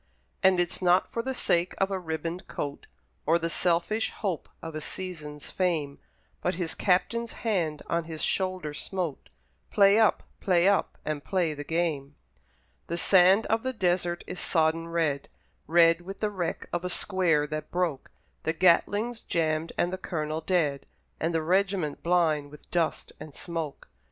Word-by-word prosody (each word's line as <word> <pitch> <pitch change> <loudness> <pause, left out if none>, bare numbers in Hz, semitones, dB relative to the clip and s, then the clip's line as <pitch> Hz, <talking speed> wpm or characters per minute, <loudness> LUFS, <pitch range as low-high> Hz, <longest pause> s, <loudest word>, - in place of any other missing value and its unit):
And 190 -1 +5
it's 175 +1 0
not 180 0 +3
for 230 - -1
the 265 +2 -3
sake 175 -6 +1
of 195 0 +1
a 190 - -1
ribboned 165 +1 -4
coat, 145 -1 -5 0.4
Or 165 +2 +5
the 165 0 -2
selfish 180 +7 +1
hope 190 -7 -4
of 165 -1 -7
a 155 - -4
season's 150 -5 -7
fame, 160 -7 -1 0.4
But 180 - 0
his 170 -2 -2
Captain's 230 +5 +1
hand 170 -9 0
on 170 -1 -1
his 160 -1 -4
shoulder 185 -5 -1
smote 175 -2 -4 0.4
"Play 200 +1 +5
up! 220 - +3 0.2
play 180 -1 +3
up! 200 0 +2
and 150 -2 -3
play 180 -5 0
the 145 0 -6
game!" 150 -3 -1 0.7
The 170 - -2
sand 190 +3 +5
of 225 +1 +1
the 260 +1 -2
desert 175 -4 0
is - - -6
sodden 165 0 +1
red, 160 -4 -1 0.4
Red 165 +1 +5
with 195 +3 -8
the 210 -1 0
wreck 180 -4 -3
of 175 0 -1
a 180 - -2
square 175 -6 +2
that 155 0 -5
broke; 175 -6 -1 0.3
The 160 - -1
Gatling's 205 +7 +2
jammed 160 -1 0
and 175 +1 +1
the 185 - -3
Colonel 155 -3 -3
dead, 155 -5 0 0.3
And 165 - 0
the 165 -1 0
regiment 185 -3 +1
blind 160 -4 +2
with 150 0 -15
dust 170 -3 0
and 150 - -10
smoke. 165 -5 -5
170 Hz, 165 wpm, -28 LUFS, 155-185 Hz, 0.7 s, And